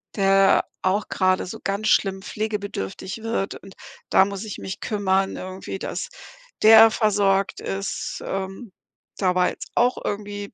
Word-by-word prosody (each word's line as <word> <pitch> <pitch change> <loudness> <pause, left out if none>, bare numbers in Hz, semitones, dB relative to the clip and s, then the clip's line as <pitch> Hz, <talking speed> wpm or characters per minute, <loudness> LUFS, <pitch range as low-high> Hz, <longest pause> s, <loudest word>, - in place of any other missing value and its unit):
der 195 -1 +4 0.2
auch 195 +3 +1
gerade 185 -1 +1
so - - -7
ganz 200 +2 -1
schlimm 195 -1 +2
pflegebedürftig 205 - -4
wird 225 -3 -2
und 195 0 -13 0.3
da 190 - +5
muss 200 +1 -5
ich 210 - -6
mich 190 - -6
kümmern 195 -3 0
irgendwie, 185 +1 -6
dass - - -4 0.5
der 225 +1 +9
versorgt 200 -3 +1
ist, 195 +1 -4
ähm. 195 +3 -5 0.5
Da 185 -2 +1
war 180 0 +3
jetzt - - -9
auch 245 +1 +3
irgendwie 205 0 -5
195 Hz, 140 wpm, -23 LUFS, 190-210 Hz, 0.5 s, der